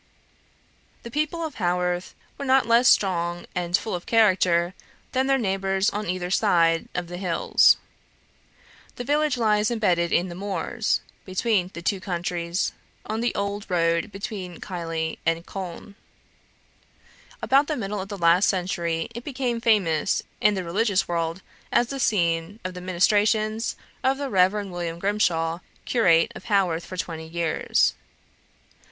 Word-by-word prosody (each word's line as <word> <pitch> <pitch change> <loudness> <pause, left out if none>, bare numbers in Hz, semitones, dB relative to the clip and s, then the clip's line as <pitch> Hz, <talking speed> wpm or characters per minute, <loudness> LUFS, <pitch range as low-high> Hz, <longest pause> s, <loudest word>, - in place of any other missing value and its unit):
The 235 - -8
people 305 +4 -1
of 310 - -5
Haworth 180 0 -1 0.2
were - - -7
not 265 -2 +4
less 235 +2 +4
strong 175 -3 +1
and 175 -1 +1
full 220 - -5
of 175 -1 -5
character 185 -5 +3 0.4
than 260 0 +1
their 270 0 +3
neighbours 195 -3 0
on 210 -2 -4
either 180 0 -2
side 170 -5 +3
of 180 - -1
the 175 +1 -7
hills. 180 -3 +4 1.2
The 245 - -5
village 295 +1 +1
lies 215 -2 +2
embedded 180 -7 +1
in 175 - +2
the 175 - -7
moors, 200 +4 -1 0.2
between 190 -1 0
the 170 - -7
two 195 +2 0
counties, 175 -1 -2 0.3
on 220 +2 -3
the 240 - 0
old 200 +1 -3
road 170 +1 +1
between 195 -4 -6
Keighley 165 -3 -4
and 165 +1 0
Colne. 190 +1 -7 1.5
About 275 +2 +4
the 305 - -2
middle 205 -2 -3
of 195 - -8
the 200 - -5
last 170 +2 +4
century, 170 -3 -1
it 235 +1 -7
became 250 -4 -2
famous 195 -7 +2 0.2
in 210 -1 +4
the 190 - -2
religious 195 +3 +1
world 170 +1 -2 0.3
as 240 - +2
the 275 - -4
scene 170 -2 0
of 185 - -3
the 180 - -8
ministrations 215 +4 +1 0.3
of 265 +1 +2
the 280 -2 -4
Rev. 195 +2 +3
William 175 -3 -4
Grimshaw, 170 -4 0 0.3
curate 185 -4 +3
of - - -11
Haworth 185 -6 +1
for 185 - -7
twenty 160 -3 -4
years. 165 0 +1
190 Hz, 145 wpm, -24 LUFS, 170-220 Hz, 1.5 s, not